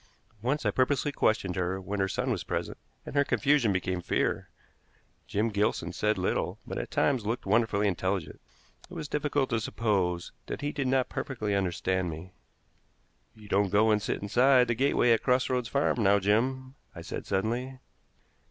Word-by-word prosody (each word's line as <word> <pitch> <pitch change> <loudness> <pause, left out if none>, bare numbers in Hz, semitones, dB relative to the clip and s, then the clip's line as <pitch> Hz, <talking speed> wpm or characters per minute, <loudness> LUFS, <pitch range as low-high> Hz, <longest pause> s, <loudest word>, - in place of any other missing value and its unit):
Once 135 +6 -1
I - - +3
purposely 135 +2 +1
questioned 105 -8 +1
her 95 +1 -1
when 100 +2 -4
her 95 - +2
son - - -1
was - - -2
present, - - -4 0.3
and - - -7
her 140 0 +4
confusion 140 -5 +2
became 90 -1 -1
fear. - - -1 0.8
Jim 105 +3 0
Gilson 100 -5 -1
said 105 +2 0
little, 90 - -1
but - - -4
at - - -5
times 130 -6 +1
looked 115 +4 -3
wonderfully 105 0 +2
intelligent. 95 -4 -2 0.5
It - - -10
was 150 - -5
difficult 145 -2 -1
to 115 - +2
suppose 95 -6 -1 0.2
that - - -5
he 145 0 -1
did 140 -3 -2
not 130 0 +2
perfectly 110 -6 -3
understand 95 -1 0
me. 85 +4 -8 1.0
"You 105 -1 -14
don't 100 0 +2
go 105 +3 +4
and 105 -1 +2
sit 105 - -3
inside 125 +4 +4
the - - +3
gateway 125 -1 +2
at 115 - +4
Cross 125 0 +2
Roads 125 -2 -1
Farm 140 -3 +1
now, 100 0 +5
Jim," 130 +7 0 0.2
I - - -8
said - - -6
suddenly. 120 +7 -2
110 Hz, 175 wpm, -29 LUFS, 95-130 Hz, 1.0 s, now